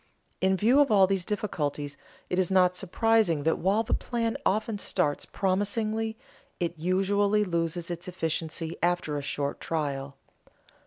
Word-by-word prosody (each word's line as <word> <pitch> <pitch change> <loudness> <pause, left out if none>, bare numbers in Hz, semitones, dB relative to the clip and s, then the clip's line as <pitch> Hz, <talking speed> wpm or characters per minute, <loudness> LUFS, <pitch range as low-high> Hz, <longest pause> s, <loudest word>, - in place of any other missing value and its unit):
In 190 0 +3
view 235 +8 +4
of 285 -2 +5
all 200 -3 +6
these 190 -1 0
difficulties 150 -8 -3 0.3
it 180 - -1
is 185 - +2
not 180 -1 +4
surprising 195 -3 +2
that 160 +1 +1
while 200 +5 +2
the 225 - -2
plan 230 -2 -1
often 215 +1 0
starts 165 -7 -1
promisingly, 215 +3 -1 0.4
it 170 -2 -1
usually 200 +5 +2
loses 170 -2 -2
its 175 +1 -5
efficiency 165 -2 -3
after 175 -3 0
a 145 - -2
short 140 0 -2
trial. 140 -3 -3
185 Hz, 145 wpm, -28 LUFS, 165-210 Hz, 0.4 s, all